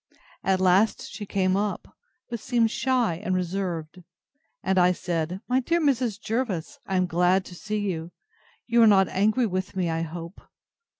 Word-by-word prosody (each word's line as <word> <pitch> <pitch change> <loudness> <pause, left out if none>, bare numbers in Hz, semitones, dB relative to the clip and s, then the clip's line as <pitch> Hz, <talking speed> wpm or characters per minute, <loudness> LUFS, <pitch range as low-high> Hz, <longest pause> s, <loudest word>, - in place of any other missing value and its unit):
At 190 -1 +2
last 190 +4 +2
she 205 -2 -7
came 185 -1 +1
up, 205 +1 -3 0.3
but 235 -2 -5
seemed 230 -1 +1
shy 235 -10 0
and 185 -2 0
reserved; 180 -2 -3 0.6
and 190 -1 +2
I 180 0 +5
said, 175 +1 -3
My 255 +1 +2
dear 335 +7 +1
Mrs. 255 -9 +1
Jervis, 215 -8 -3
I 195 - -1
am 185 0 +3
glad 180 +2 +2
to - - -10
see 215 +4 -4
you: 175 -5 -3 0.6
you 235 0 +3
are 225 - +8
not 195 -3 +5
angry 215 +6 +2
with 185 -1 -3
me, 180 -3 0
I 165 0 -1
hope. 165 +2 -7
190 Hz, 170 wpm, -26 LUFS, 180-225 Hz, 0.6 s, are